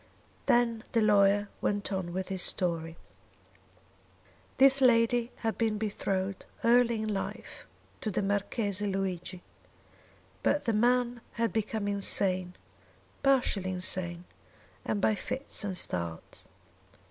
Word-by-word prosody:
Then 235 -2 +2
the 230 - +3
lawyer 205 -1 +4
went 205 0 -1
on 185 -2 -3
with 185 +2 -4
his 190 -1 -2
story. 165 -3 -1 1.6
This 270 +1 +6
lady 240 -1 +3
had 225 - -1
been 220 -2 +1
betrothed 195 -2 -3 0.2
early 235 -1 +3
in 215 -1 -2
life 195 - -6 0.3
to 220 - -2
the 200 - -1
Marchese 205 0 -1
Luigi; 185 -2 -3 1.0
but 295 - +1
the 230 - +1
man 240 +2 +2
had 230 -4 -1
become 215 -1 -2
insane 185 -2 +1 0.7
partially 255 -8 +2
insane 180 -1 -2 0.6
and 205 - -2
by 220 - +3
fits 255 +5 -3
and 195 -3 -2
starts. 85 - -4
205 Hz, 115 wpm, -29 LUFS, 185-230 Hz, 1.6 s, This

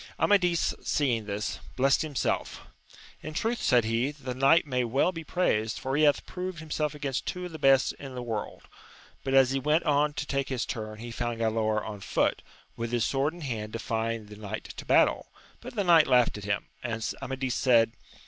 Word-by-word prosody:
Amadis 180 -4 +3
seeing 120 -7 0
this, 105 +1 -3 0.2
blessed 135 +1 +3
himself: 150 -4 -2 0.6
In 155 - -7
truth, 230 +5 -1
said 120 -3 +3
he, 115 +4 +1
the 140 -4 -6
knight 135 +6 +4
may 125 -3 0
well 135 +9 +2
be 165 -2 -7
praised, 110 -11 0
for 135 +1 -2
he 150 - +2
hath 145 -2 +3
proved 185 -1 -5
himself 150 -1 -2
against 140 -3 -3
two 180 0 -3
of 180 - -7
the 160 - -8
best 135 -2 +4
in 135 -2 -8
the 125 - -4
world; 110 -3 -5 0.6
but 135 - 0
as 135 -1 +6
he 135 - 0
went 150 +4 +2
on 150 0 +2
to 145 - -4
take 140 -1 -2
his 130 -3 -1
turn 110 -3 -5
he 120 +2 -7
found 120 0 -3
Galaor 110 -1 0
on 105 -2 -6
foot, - - 0 0.3
with 115 0 -4
his 120 -2 +1
sword 140 +4 0
in 175 - -11
hand 110 -6 -4
defying 115 -1 -2
the 105 0 -11
knight 110 +1 -6
to - - -7
battle, - - +3 0.3
but 250 +1 -10
the 205 - +1
knight 170 -4 +6
laughed 125 -2 +4
at 105 -1 -7
him 100 0 -1 0.2
3 120 -1 -3
and 110 0 -2
Amadis 130 -1 -2
said*. 115 -4 +4
130 Hz, 205 wpm, -28 LUFS, 115-150 Hz, 0.6 s, as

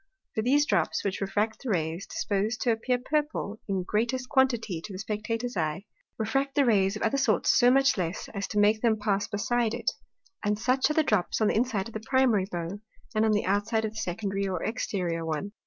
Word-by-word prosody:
For 220 - 0
those 280 +6 +3
drops, 190 - +1
which 195 0 -2
refract 210 +3 -1
the 265 - -5
Rays, 165 -1 -1
disposed 210 +4 -1
to 240 - +2
appear 240 +3 0
Purple, 275 -5 -2
in 190 -2 -1
greatest 240 +6 -1
quantity 240 - +1
to 205 - -8
the 185 - -6
Spectator's 220 +4 -3
Eye, 165 +3 -2 0.3
refract 270 +5 -1
the 285 - +4
Rays 200 -4 +3
of 210 - -4
other 275 - +1
sorts 265 - +3
so 245 - +6
much 270 -3 +4
less, 175 +2 -3
as 200 -1 -3
to 210 - -5
make 210 +1 +4
them 225 -2 +3
pass 205 -1 0
beside 235 +2 0
it; 240 - -1 0.5
and 210 0 +1
such 255 +5 +2
are - - +1
the 315 - +4
drops 210 -10 +1
on 215 - +3
the - - 0
inside 220 -3 0
of 230 - -12
the 220 - -3
Primary 225 -4 +2
Bow, 175 +3 -4 0.3
and 215 +1 +2
on 220 - +3
the 210 0 +1
outside 210 +3 +1
of 215 - -3
the 220 - -11
Secondary 195 0 -2
or 180 -3 -3
Exteriour 180 -7 -2
one. 165 +5 -3
215 Hz, 215 wpm, -28 LUFS, 195-240 Hz, 0.5 s, so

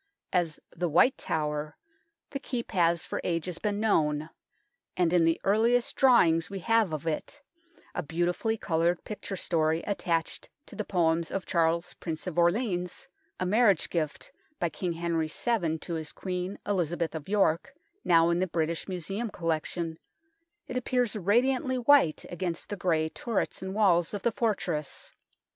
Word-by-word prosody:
As 170 -4 +1
" - - -52
the 175 0 -1
White 180 - +5
Tower 150 -1 -2 0.3
" 330 0 -52
the 275 - -3
Keep 245 -3 -4
has 170 -2 +2
for - - -4
ages 170 0 -2
been 205 -1 -1
known, 155 -7 +1 0.7
and 175 -2 +2
in 170 -2 +5
the 165 0 +2
earliest 230 +4 +2
drawing 205 -11 +5
we 200 - -5
have 225 -1 +2
of 155 0 -4
it, 225 - -3 0.5
a 180 - -2
beautifully 175 +8 -1
coloured 170 -1 0
picture 205 -2 -5
story 160 -2 0
attached 170 -5 -2 0.2
to - - -12
the 215 - -2
Poems 165 -4 +1
of 195 -1 -3
Charles 170 0 +1
Prince 160 -2 -5
of 175 -2 -2
Orleans 180 0 0 0.3
a 185 - 0
marriage 205 -2 +3
gift 155 -4 -2 0.3
by 170 - +1
King 175 +1 -3
Henry 165 -1 -1
VII 175 -10 0
to 170 - -6
his 160 -2 -4
Queen, 180 +1 -4
Elizabeth 175 -4 -1
of 160 +1 -7
York, 200 - +1 0.3
now 165 0 +5
in 170 - +1
the 185 - +1
British 165 0 -2
Museum 195 +5 -3
collection 165 -1 -2 0.7
it - - -6
appears 250 -3 +1
radiantly 250 +6 +2
white 250 - +4
against 175 -1 -4
the 205 - -2
grey 165 -4 +1
turrets 225 +6 -2
and 190 +1 -5
walls 185 -4 +3
of 200 - -5
the 235 - +2
fortress. 190 - -2
175 Hz, 160 wpm, -28 LUFS, 165-210 Hz, 0.7 s, White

